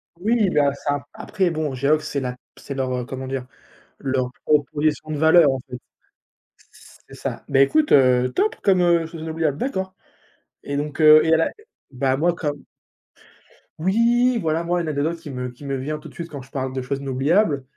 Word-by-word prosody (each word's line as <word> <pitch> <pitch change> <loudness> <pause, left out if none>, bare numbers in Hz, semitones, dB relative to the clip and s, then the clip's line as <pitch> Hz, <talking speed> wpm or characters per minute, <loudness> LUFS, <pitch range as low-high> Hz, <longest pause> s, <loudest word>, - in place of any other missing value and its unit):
Oui, 210 +3 +1
bah, 145 -4 +2
ça! 145 0 -3
Après, 190 -4 -1
bon, 155 -4 -2
Geox, 145 +4 +2
c'est 140 - -2
la 125 -2 -3
p - - -18 0.2
c'est 140 - -7
leur, 130 -1 -2
heu, 125 -1 -3
comment 130 +1 -6
dire, 130 -1 -4 0.5
leur 130 -2 -1 0.2
proposition 150 +1 +1
de 155 - -2
valeur, 160 0 +6
en 135 - -2
fait. 125 - -7 1.3
C'est - - -11
ça, - - -6
ben, 135 -1 +3
écoute, 305 - +3
heu, 125 -2 +4
top 430 +4 +1
comme, 190 -2 +3
heu, 170 -1 +3
chose 165 -1 -9
inoubliable. 160 -3 -2
D'accord 190 - -3 0.7
et 140 - -4
donc 145 +1 -4
heu, 155 0 +8
et 160 +1 +3
à - - +5
là, 165 - +1 0.4
ben, 130 0 0
moi, 170 +3 +2
comme 150 -4 -4 1.2
Oui, 235 +7 +2
voilà, 160 0 0
moi, 175 +1 0
une 165 - -4
anecdote 155 +3 -1
qui 160 - -10
me 125 -2 -4
qui 125 +3 -15
me 140 -1 -3
vient 150 +4 -4
tout - - -11
de - - -18
suite, 170 0 -6
quand 140 -3 -7
je 130 - -16
parle 130 -1 -4
de 130 - -3
choses 135 +2 -3
inoubliables, 140 +4 +1
150 Hz, 200 wpm, -22 LUFS, 135-170 Hz, 1.3 s, heu